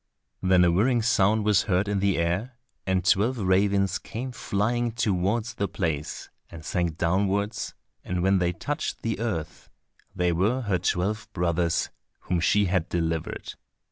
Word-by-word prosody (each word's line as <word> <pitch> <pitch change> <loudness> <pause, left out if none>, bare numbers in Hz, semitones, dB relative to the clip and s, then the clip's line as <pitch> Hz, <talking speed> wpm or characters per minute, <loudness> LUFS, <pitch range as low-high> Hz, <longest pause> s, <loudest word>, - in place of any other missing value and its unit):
Then 95 -1 +4
a 85 - +4
whirring 115 +6 +2
sound 110 -2 +3
was 105 -3 +3
heard 95 +2 +2
in 100 -1 0
the 100 -1 +1
air, 95 +9 -1 0.3
and 95 -1 +1
twelve 110 +7 +3
ravens 100 -1 +2
came 125 +3 -6
flying 120 +1 -1
towards 110 +2 0
the 100 -3 -1
place, 80 -5 -3 0.2
and 80 -1 -10
sank 85 -3 -1
downwards, 100 +5 0 0.3
and 90 -1 -2
when 95 0 +3
they 90 -1 +1
touched 145 - -4
the 115 -3 -2
earth 90 -10 -4 0.5
they 90 0 +1
were 105 +10 +1
her 100 -6 0
twelve 100 +5 -1
brothers, 85 -1 0 0.3
whom 90 -1 -1
she 100 +4 +3
had 90 -2 0
delivered. 80 -2 -2
95 Hz, 150 wpm, -26 LUFS, 90-110 Hz, 0.5 s, Then